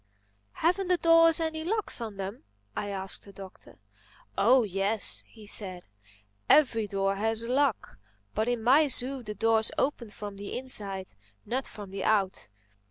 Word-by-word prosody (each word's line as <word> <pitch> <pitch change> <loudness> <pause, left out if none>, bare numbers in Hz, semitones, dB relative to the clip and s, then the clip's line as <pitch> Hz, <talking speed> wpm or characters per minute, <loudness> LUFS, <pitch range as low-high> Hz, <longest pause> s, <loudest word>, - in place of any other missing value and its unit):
"Haven't 365 +4 0
the 360 0 +3
doors 330 -1 +5
any 320 -1 -3
locks 425 - -2
on 215 -3 -6
them?" 195 - -6 0.3
I 205 - -3
asked 195 -1 -5
the 200 - -13
Doctor. 195 -1 -13 0.6
"Oh 255 -1 +4
yes," 200 +1 0
he 220 -2 -15
said, 185 -4 0 0.7
"every 230 -8 +4
door 195 -1 -1
has 225 +2 +1
a 235 - -4
lock. 270 - 0 0.3
But 220 +2 -1
in 240 -2 -1
my 280 +6 +5
zoo 260 0 +2
the 210 -3 -7
doors 225 0 +3
open 265 -5 -1
from 205 -1 -8
the 200 0 -6
inside, 200 -7 -1 0.3
not 260 +2 -2
from 205 -3 -10
the 195 -1 -5
out. 195 - 0
220 Hz, 160 wpm, -28 LUFS, 200-270 Hz, 0.7 s, doors